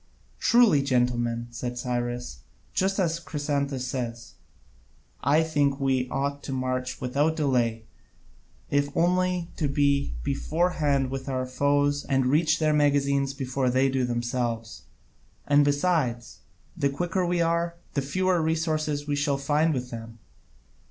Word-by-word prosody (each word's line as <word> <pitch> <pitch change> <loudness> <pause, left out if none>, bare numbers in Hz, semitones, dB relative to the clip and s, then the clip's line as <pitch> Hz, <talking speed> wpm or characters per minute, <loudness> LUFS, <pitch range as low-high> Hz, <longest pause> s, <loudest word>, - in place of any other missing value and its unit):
"Truly, 235 - +5
gentlemen," 120 -3 0
said 120 +1 -5
Cyrus, 120 - -3 0.4
"as 190 -4 +1
Chrysantas 140 -4 -2
says, 120 -3 -5 0.9
I 150 +3 +4
think 145 -3 +1
we 130 -2 0
ought 140 +2 -2
to - - -6
march 130 -1 -2
without 140 +5 0
delay, 120 -7 0 0.9
if 145 0 +2
only 180 0 +1
to 155 - 0
be 140 - +1
beforehand 145 -3 0
with 135 0 -4
our 130 -1 -1
foes, 145 +2 +1
and 135 -1 +1
reach 155 +4 +3
their 155 -1 +2
magazines 140 -2 +2
before 130 -1 -1
they 130 +2 +3
do 130 -1 0
themselves; 120 -1 -3 0.6
and 145 0 +5
besides, 145 -5 0 0.4
the 140 -5 +1
quicker 175 +6 -1
we 175 0 0
are, 170 0 +1 0.2
the 140 - 0
fewer 185 +5 +1
resources 155 -2 -1
we 145 -1 -1
shall 145 -1 0
find 150 +3 +1
with 125 -3 -3
them. 115 0 -8
140 Hz, 130 wpm, -26 LUFS, 125-155 Hz, 0.9 s, Truly